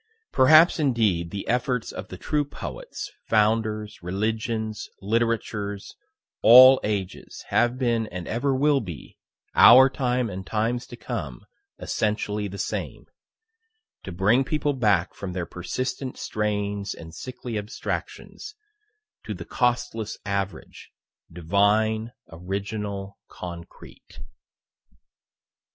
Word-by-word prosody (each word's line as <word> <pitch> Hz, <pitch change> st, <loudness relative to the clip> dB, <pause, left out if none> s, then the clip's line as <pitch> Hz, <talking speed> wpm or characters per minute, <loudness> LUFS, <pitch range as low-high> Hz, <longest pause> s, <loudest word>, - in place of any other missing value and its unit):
Perhaps 155 Hz, +6 st, +6 dB
indeed 110 Hz, -, +1 dB
the 100 Hz, +2 st, -6 dB
efforts 125 Hz, -1 st, -1 dB
of 95 Hz, -, -7 dB
the 95 Hz, -, -9 dB
true 150 Hz, -, 0 dB
poets, 145 Hz, -, -7 dB, 0.2 s
founders, 110 Hz, -1 st, +1 dB
religions, 110 Hz, +3 st, -3 dB
literatures, 105 Hz, -2 st, -2 dB, 0.5 s
all 130 Hz, +3 st, +9 dB
ages, 100 Hz, -3 st, -4 dB
have 120 Hz, +1 st, +2 dB
been, 115 Hz, -3 st, 0 dB
and 90 Hz, -3 st, -7 dB
ever 135 Hz, +4 st, 0 dB
will 145 Hz, +1 st, +3 dB
be, 85 Hz, -, -9 dB, 0.3 s
our 130 Hz, +2 st, +8 dB
time 125 Hz, -2 st, 0 dB
and 95 Hz, -2 st, -6 dB
times 115 Hz, +5 st, -1 dB
to 120 Hz, -, -9 dB
come, 85 Hz, -, -6 dB, 0.3 s
essentially 105 Hz, -1 st, -2 dB
the 100 Hz, +1 st, -8 dB
same -, -, -4 dB, 1.0 s
to 95 Hz, -, -8 dB
bring 105 Hz, +9 st, +3 dB
people 145 Hz, +1 st, -1 dB
back 105 Hz, -8 st, +1 dB
from 95 Hz, -3 st, -6 dB
their 90 Hz, -2 st, -3 dB
persistent 125 Hz, -, -4 dB
strayings 105 Hz, -1 st, -2 dB
and 80 Hz, 0 st, -11 dB
sickly 125 Hz, +3 st, -7 dB
abstractions, 110 Hz, -, -5 dB, 0.7 s
to 105 Hz, -, -5 dB
the 85 Hz, -1 st, -8 dB
costless 120 Hz, -3 st, -1 dB
average, 100 Hz, -4 st, -4 dB, 0.4 s
divine, 105 Hz, +6 st, +1 dB, 0.2 s
original 100 Hz, +3 st, -5 dB
concrete. 85 Hz, -1 st, -11 dB
110 Hz, 105 wpm, -25 LUFS, 100-125 Hz, 1.0 s, all